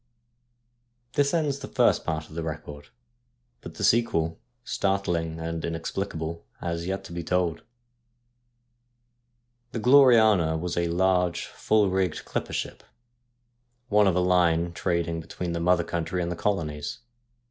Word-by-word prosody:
This 140 -1 +2
ends 150 -4 0
the - - -7
first - - +2
part 80 0 -3
of - - -15
the 85 - -3
record, 75 -2 -7 0.7
but - - -10
the - - -5
sequel 85 -9 +2
— 120 0 -47
startling 85 -7 -1
and 80 0 -4
inexplicable 85 0 -4
— - - -37
has 85 0 -3
yet 95 +1 -3
to - - -11
be 85 0 -4
told. 90 -1 0 2.1
The 115 - -2
Gloriana 110 - +5
was 85 +1 -3
a 85 0 +1
large, 90 0 +1
full 105 -3 +1
rigged, 95 -1 -1
clipper - - -3
ship, - - -4 1.1
one 105 -1 +4
of 95 - +2
a 90 - +2
line 85 -2 +2
trading 85 -2 -1
between 85 +2 -5
the 85 - -2
mother 85 +1 +3
country 85 +2 -2
and 85 - -3
the - - -2
colonies. 75 -5 -2
85 Hz, 145 wpm, -26 LUFS, 80-100 Hz, 2.1 s, Gloriana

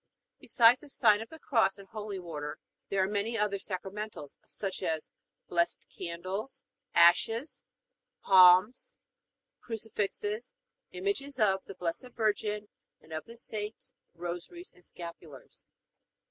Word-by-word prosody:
Besides 240 +1 +5
the 295 - -12
sign 215 -6 +4
of 225 - -8
the 320 - -11
Cross 225 -9 +2
and 200 -1 -13
holy 210 -3 -5
water 155 -4 -5 0.3
there 195 -1 +2
are - - +1
many 210 +3 -1
other 205 -2 0
sacramentals, 195 -4 -6
such 195 -2 -5
as 160 -1 -2 0.4
blessed 170 0 0
candles, 185 +8 -5 0.3
ashes, 225 - +4 0.6
palms, 185 +4 +6 0.6
crucifixes, 220 - -4 0.3
images 325 -8 -3
of 195 -3 +3
the 195 - -9
Blessed 180 +8 -4
Virgin 210 -1 0 0.3
and 160 - -13
of 155 - -4
the 230 +1 -12
saints, 215 -2 -6 0.2
rosaries, 175 - -6
and 180 - -22
scapulars. 170 -5 -11
205 Hz, 120 wpm, -31 LUFS, 180-225 Hz, 0.6 s, palms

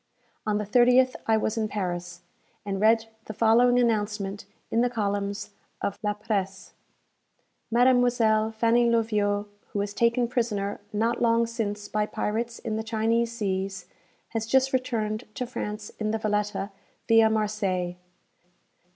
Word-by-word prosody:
On 210 -1 +2
the 210 - -2
30th 250 +4 +4
I 220 -1 +4
was 220 +1 -1
in 215 - 0
Paris, 175 -4 -4 0.4
and 195 -1 -3
read 225 +1 +4 0.2
the 215 - -7
following 240 +3 +4
announcement 210 -4 -1 0.3
in 230 - +2
the 245 - +2
columns 205 -2 -2 0.3
of 200 - -3
La 210 -1 0
Presse: 195 -2 -3 1.0
"Mademoiselle 235 -3 +3
Fanny 230 +2 +3
Loviot, 210 -3 +1 0.3
who - - -2
was 200 0 -2
taken 235 +2 +2
prisoner 215 -5 -1
not 230 +3 0
long 230 0 +3
since 210 -3 -4
by 210 0 -1
pirates 230 +3 -2
in 215 -1 -3
the 220 - -2
Chinese 225 +1 0
seas, 195 -4 -3 0.4
has 225 -1 -3
just 265 +2 +3
returned 230 -3 -1
to 250 - -2
France 210 -3 -5
in 215 -1 -1
the 220 - 0
'Valetta,' 210 -1 -1 0.4
via 225 -1 +6
Marseilles." 200 -5 -1
220 Hz, 140 wpm, -26 LUFS, 205-235 Hz, 1.0 s, via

